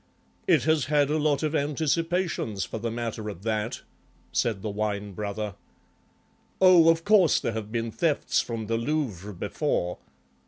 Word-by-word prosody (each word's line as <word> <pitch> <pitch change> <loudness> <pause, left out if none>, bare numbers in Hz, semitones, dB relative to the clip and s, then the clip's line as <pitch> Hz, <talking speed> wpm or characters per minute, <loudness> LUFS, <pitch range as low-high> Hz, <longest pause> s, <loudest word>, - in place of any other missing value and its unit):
"It - - +4
has 155 -2 +2
had 145 -1 +2
a 155 - +1
lot 150 0 +1
of 155 0 0
anticipations, 155 - 0
for 110 - -6
the 115 +2 -2
matter 115 -2 -4
of 95 -2 -9
that," 110 0 -2 0.5
said 110 -5 0
the 110 - -2
Wine 105 -1 -2
brother. 105 +1 -4 1.1
"Oh, 180 -3 +7
of 165 0 +3
course 200 -5 +5
there - - -2
have 110 -1 -5
been 115 0 -2
thefts 155 +3 +1
from 115 -2 -5
the 115 +2 0
Louvre 115 - -2
before." 90 -1 -2
115 Hz, 155 wpm, -26 LUFS, 105-155 Hz, 1.1 s, Oh